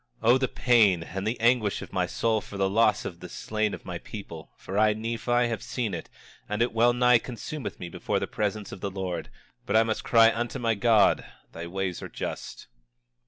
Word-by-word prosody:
26:7 115 - +3
O 125 - +7
the 130 - +1
pain, 110 -11 +3
and 95 +4 -5
the 115 +2 -2
anguish 115 -3 +2
of - - -12
my - - +1
soul 110 -1 0
for 100 - -9
the 95 0 +2
loss 105 +2 +2
of 85 - -6
the 90 - -9
slain 110 +3 -2
of - - -15
my 90 -2 -5
people! 85 -7 -9
For 95 - -7
I, 105 +1 +4
Nephi, 115 +2 0
have 115 -4 -3
seen 115 -6 -3
it, 85 - -6 0.4
and 105 +3 +1
it 120 - -2
well 115 +2 +4
nigh 125 0 +4
consumeth 135 +5 -6
me 90 - -5
before 85 - -2
the - - -2
presence 105 -1 -3
of 95 - -9
the 100 - -2
Lord; 95 -2 -4 0.4
but - - 0
I 110 - +6
must 110 -1 -2
cry 115 -1 +6
unto 120 +1 -3
my 115 -2 +1
God: 110 0 +4 0.3
Thy 85 +1 -7
ways 95 0 -3
are - - -7
just. - - -6
110 Hz, 215 wpm, -27 LUFS, 95-115 Hz, 0.4 s, O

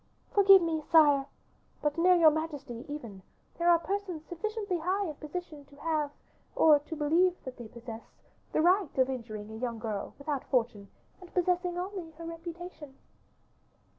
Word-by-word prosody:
"Forgive 390 -2 +7
me, 320 -2 -1
sire, 290 -4 +6 0.6
but 295 -1 +1
near 360 +2 +5
your 325 -3 +7
majesty, 290 -6 -4
even, 235 -10 -7 0.4
there 340 +1 +3
are 340 - +7
persons 360 -2 -4
sufficiently 405 +1 -3
high 375 +5 0
in 315 - -4
position 305 -1 -7
to 285 - -19
have, 305 -1 -1 0.5
or 305 -2 +6
to 300 +3 -7
believe 330 +5 +3
that 260 -1 -8
they 240 -2 -8
possess, 230 0 -10 0.3
the - - +2
right 365 -2 +3
of 260 0 +3
injuring 220 -4 -6
a 220 - -7
young 235 -1 -3
girl, 220 -3 -4
without 280 -1 -3
fortune, 225 -5 0 0.3
and 360 - -13
possessing 360 0 +1
only 365 -2 -5
her 335 +1 -10
reputation." 330 -3 -8
315 Hz, 160 wpm, -30 LUFS, 265-355 Hz, 0.6 s, Forgive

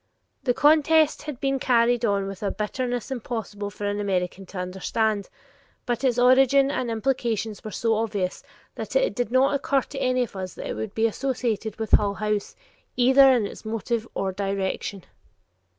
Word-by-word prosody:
The 245 -2 +2
contest 310 +1 +4
had 300 -5 -7
been 270 -1 0
carried 240 -1 +2
on 200 -2 +1
with 195 -1 -7
a 205 - 0
bitterness 245 +4 -3
impossible 220 -5 -4
for 205 0 -7
an 205 0 -1
American 190 -1 -2
to 195 - -9
understand, 200 +3 -1 0.6
but 240 +1 -2
its 250 -3 +2
origin 270 +2 +5
and 250 -4 -2
implications 225 -3 -1
were 215 - -5
so 225 +1 0
obvious 210 -4 -2 0.3
that - - -7
it - - +2
did 245 -3 -2
not 260 +3 +4
occur 280 -1 +1
to 270 +2 -8
any 255 -1 +1
of 230 - -8
us 185 -1 -5
that - - -7
it - - -3
could 220 -2 -5
be 225 - +2
associated 230 -3 -2
with 220 -1 -4
Hull 200 -1 +4
House 210 -1 -2 0.4
either 265 +2 +6
in 240 -5 +2
its - - -8
motive 225 +1 -2
or 195 -1 -1
direction. 195 0 -3
225 Hz, 175 wpm, -25 LUFS, 205-255 Hz, 0.6 s, either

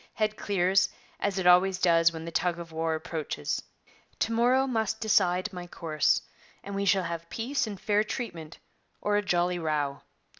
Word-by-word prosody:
Head 215 -1 0
clears, 190 -1 +2 0.3
as 200 -1 -1
it 190 - -1
always 180 +1 +5
does 165 -2 +4
when 160 0 -7
the 170 - -6
tug 175 0 0
of 170 -1 -8
war 160 0 -1
approaches. 155 - -3 0.6
To 230 - +1
morrow 245 +3 +3
must 220 -4 -1
decide 190 -3 +2
my 180 -1 -7
course, 155 -3 +1 0.4
and 200 - -7
we 200 0 -1
shall 195 -1 +3
have 170 0 -5
peace 245 +2 -1
and 205 -3 -6
fair 210 +1 +2
treatment, 170 -9 -6 0.4
or 205 0 0
a 205 - +3
jolly 180 -2 +1
row. 150 -4 -1
180 Hz, 175 wpm, -28 LUFS, 165-210 Hz, 0.6 s, always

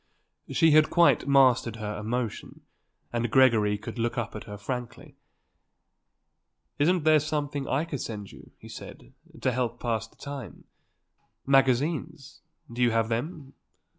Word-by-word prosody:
She 165 -1 +4
had 155 +1 +5
quite 170 -4 +4
mastered 130 -4 +4
her 105 -1 -5
emotion 115 +1 -4 0.5
and 120 0 -1
Gregory 110 -5 +4
could 105 +3 -8
look 120 +2 -1
up 115 -3 -3
at 105 - -7
her 105 -1 -8
frankly. 120 +3 -6 1.6
"Isn't 170 +3 +2
there 155 0 +5
something 145 -2 -3
I 145 +5 0
could 145 -6 -5
send 105 -3 -6
you," - - -15
he - - -14
said, - - -11 0.3
"to 130 - +1
help 125 -1 -1
to - - -19
pass 115 -3 -1
the - - -27
time? 140 -4 -8 0.8
Magazines? 140 +3 +1 0.3
Do 120 - -4
you 120 - +5
have 115 0 0
them? 135 +4 -4
130 Hz, 145 wpm, -27 LUFS, 115-145 Hz, 1.6 s, had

